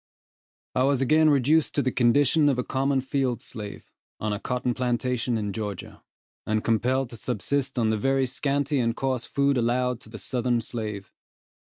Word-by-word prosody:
I 130 Hz, -, +1 dB
was 135 Hz, 0 st, +3 dB
again 155 Hz, +3 st, +4 dB
reduced 145 Hz, +3 st, +3 dB
to 145 Hz, -, +2 dB
the 130 Hz, -, +1 dB
condition 140 Hz, +5 st, +4 dB
of 135 Hz, -, +1 dB
a 125 Hz, -, 0 dB
common 135 Hz, +1 st, 0 dB
field 130 Hz, -3 st, -1 dB
slave, 105 Hz, -4 st, -9 dB, 0.3 s
on 105 Hz, -1 st, -1 dB
a 105 Hz, -, -3 dB
cotton 125 Hz, +1 st, -1 dB
plantation 125 Hz, -1 st, -1 dB
in 105 Hz, -2 st, -3 dB
Georgia, 105 Hz, -3 st, -6 dB, 0.4 s
and 110 Hz, 0 st, -1 dB
compelled 125 Hz, +3 st, +1 dB
to 115 Hz, -, -9 dB
subsist 130 Hz, +5 st, -2 dB
on 110 Hz, -2 st, +2 dB
the 110 Hz, -, 0 dB
very 135 Hz, +3 st, +2 dB
scanty 140 Hz, +2 st, 0 dB
and 115 Hz, -1 st, 0 dB
coarse 130 Hz, -3 st, -1 dB
food 140 Hz, -2 st, +1 dB
allowed 125 Hz, +1 st, 0 dB
to -, -, -14 dB
the 110 Hz, -, -8 dB
southern 125 Hz, 0 st, 0 dB
slave. 105 Hz, -4 st, -5 dB
125 Hz, 175 wpm, -26 LUFS, 115-135 Hz, 0.4 s, again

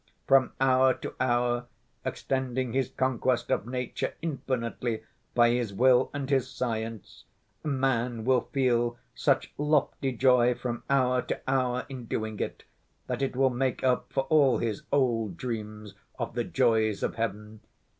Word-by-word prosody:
From 135 Hz, -2 st, +4 dB
hour 130 Hz, 0 st, +4 dB
to -, -, -7 dB
hour 120 Hz, -1 st, +1 dB, 0.4 s
extending 130 Hz, -2 st, -2 dB
his 130 Hz, -1 st, +1 dB
conquest 130 Hz, -2 st, 0 dB
of 110 Hz, -, 0 dB
nature 125 Hz, -1 st, -3 dB
infinitely 125 Hz, -6 st, -2 dB, 0.3 s
by 120 Hz, -1 st, +5 dB
his 120 Hz, -4 st, -1 dB
will 125 Hz, +2 st, +4 dB
and 140 Hz, -2 st, -4 dB
his 135 Hz, -2 st, +1 dB
science, 115 Hz, -4 st, -4 dB, 0.4 s
man 125 Hz, -5 st, 0 dB
will 130 Hz, -2 st, +2 dB
feel 120 Hz, -3 st, +1 dB, 0.2 s
such -, -, +1 dB
lofty 145 Hz, -2 st, +1 dB
joy 125 Hz, -1 st, +4 dB
from 120 Hz, -1 st, -4 dB
hour 125 Hz, -2 st, +3 dB
to 125 Hz, -, -4 dB
hour 125 Hz, -2 st, +1 dB
in 130 Hz, -4 st, -7 dB
doing 110 Hz, -1 st, -3 dB
it -, -, -4 dB, 0.4 s
that -, -, -3 dB
it 135 Hz, -2 st, -1 dB
will 135 Hz, 0 st, +3 dB
make 130 Hz, 0 st, -1 dB
up 130 Hz, -1 st, +1 dB
for 135 Hz, -, +1 dB
all 140 Hz, -2 st, +4 dB
his 110 Hz, -3 st, -2 dB
old 115 Hz, -9 st, +1 dB
dreams 105 Hz, -4 st, -5 dB, 0.2 s
of -, -, -4 dB
the -, -, -1 dB
joys 110 Hz, -2 st, +2 dB
of -, -, 0 dB
heaven. 105 Hz, -1 st, -4 dB
125 Hz, 145 wpm, -28 LUFS, 115-130 Hz, 0.4 s, by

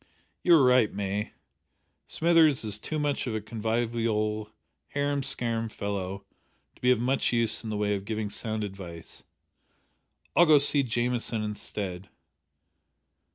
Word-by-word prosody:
"You 175 Hz, -, +6 dB
are 150 Hz, -, +5 dB
right, 125 Hz, -4 st, +4 dB
May. 100 Hz, +1 st, -3 dB, 0.7 s
Smithers 160 Hz, -5 st, +4 dB
is 105 Hz, -1 st, 0 dB
too 155 Hz, -, -4 dB
much 145 Hz, -3 st, -1 dB
of 115 Hz, -, -2 dB
a -, -, 0 dB
convivial 110 Hz, -1 st, -1 dB, 0.4 s
harum 145 Hz, 0 st, -1 dB
scarum 115 Hz, -4 st, 0 dB
fellow 100 Hz, -2 st, -4 dB, 0.5 s
to -, -, -26 dB
be 125 Hz, -, +3 dB
of 125 Hz, -3 st, +4 dB
much 130 Hz, +3 st, +1 dB
use 115 Hz, -2 st, +2 dB
in 110 Hz, -, -5 dB
the 105 Hz, -, -2 dB
way 105 Hz, 0 st, 0 dB
of 100 Hz, -1 st, -3 dB
giving 110 Hz, -1 st, -3 dB
sound 110 Hz, 0 st, -3 dB
advice. 90 Hz, -5 st, -8 dB, 1.1 s
I'll 175 Hz, -, +6 dB
go 155 Hz, -, +7 dB
to -, -, +7 dB
see 140 Hz, 0 st, +3 dB
Jamieson 120 Hz, -2 st, -1 dB
instead. 100 Hz, -3 st, -5 dB
110 Hz, 145 wpm, -27 LUFS, 105-125 Hz, 1.1 s, go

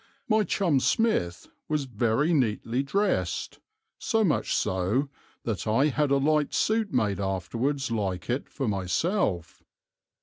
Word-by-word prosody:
My 215 Hz, -1 st, +3 dB
chum 175 Hz, -8 st, +1 dB
Smith 130 Hz, -, 0 dB, 0.2 s
was 150 Hz, -2 st, 0 dB
very 120 Hz, +6 st, +1 dB
neatly 120 Hz, -2 st, 0 dB
dressed, 195 Hz, +10 st, -1 dB, 0.4 s
so 225 Hz, -2 st, +1 dB
much 175 Hz, -, +1 dB
so 95 Hz, +10 st, 0 dB, 0.3 s
that 110 Hz, -2 st, -3 dB
I 130 Hz, +8 st, +3 dB
had 150 Hz, +1 st, +1 dB
a 140 Hz, -, +3 dB
light 150 Hz, +1 st, +1 dB
suit 220 Hz, -2 st, +1 dB
made 100 Hz, -7 st, 0 dB
afterwards 115 Hz, +9 st, -2 dB
like 95 Hz, -5 st, -2 dB
it 125 Hz, +4 st, -2 dB
for 135 Hz, -4 st, -3 dB
myself. 95 Hz, -, -1 dB
135 Hz, 130 wpm, -27 LUFS, 105-155 Hz, 0.4 s, My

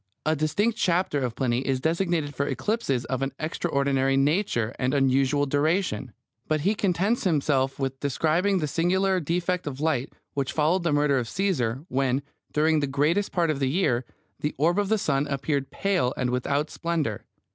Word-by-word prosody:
A 155 Hz, +1 st, +2 dB
distinct 205 Hz, +10 st, 0 dB
chapter 175 Hz, -4 st, +1 dB
of 125 Hz, -3 st, -2 dB
Pliny 125 Hz, -3 st, 0 dB
is 135 Hz, 0 st, -1 dB
designed 165 Hz, -1 st, 0 dB
for 140 Hz, +2 st, -1 dB
eclipses 135 Hz, -, -1 dB
of 130 Hz, -1 st, -2 dB
an 135 Hz, 0 st, -2 dB
extraordinary 140 Hz, -4 st, 0 dB
nature 135 Hz, -, +1 dB
and 130 Hz, +2 st, +1 dB
unusual 135 Hz, +1 st, +2 dB
duration; 145 Hz, -1 st, 0 dB, 0.4 s
but 155 Hz, -1 st, 0 dB
he 195 Hz, +7 st, +2 dB
contents 200 Hz, +3 st, 0 dB
himself 140 Hz, -6 st, +1 dB
with 135 Hz, -1 st, -3 dB
describing 160 Hz, +8 st, +1 dB
the 155 Hz, -4 st, -1 dB
singular 185 Hz, +5 st, +1 dB
defect 175 Hz, +2 st, -1 dB
of 135 Hz, -2 st, -5 dB
light 145 Hz, -4 st, 0 dB, 0.2 s
which 140 Hz, -2 st, -2 dB
followed 160 Hz, +5 st, +2 dB
the 170 Hz, -2 st, 0 dB
murder 145 Hz, -2 st, +3 dB
of 120 Hz, -2 st, -4 dB
Caesar, 145 Hz, -, -1 dB
when, 135 Hz, -2 st, 0 dB, 0.3 s
during 155 Hz, +1 st, +3 dB
the 145 Hz, -, 0 dB
greatest 150 Hz, +9 st, +1 dB
part 170 Hz, -3 st, +1 dB
of 145 Hz, -, -3 dB
the 135 Hz, -2 st, +1 dB
year, 130 Hz, -6 st, +1 dB, 0.4 s
the 150 Hz, -, -2 dB
orb 170 Hz, +7 st, +2 dB
of 200 Hz, -1 st, 0 dB
the 220 Hz, -, +3 dB
sun 145 Hz, -6 st, 0 dB
appeared 140 Hz, 0 st, -1 dB
pale 185 Hz, -10 st, 0 dB
and 125 Hz, -1 st, 0 dB
without 140 Hz, +4 st, -1 dB
splendour. 160 Hz, -11 st, -2 dB
145 Hz, 175 wpm, -26 LUFS, 135-175 Hz, 0.4 s, murder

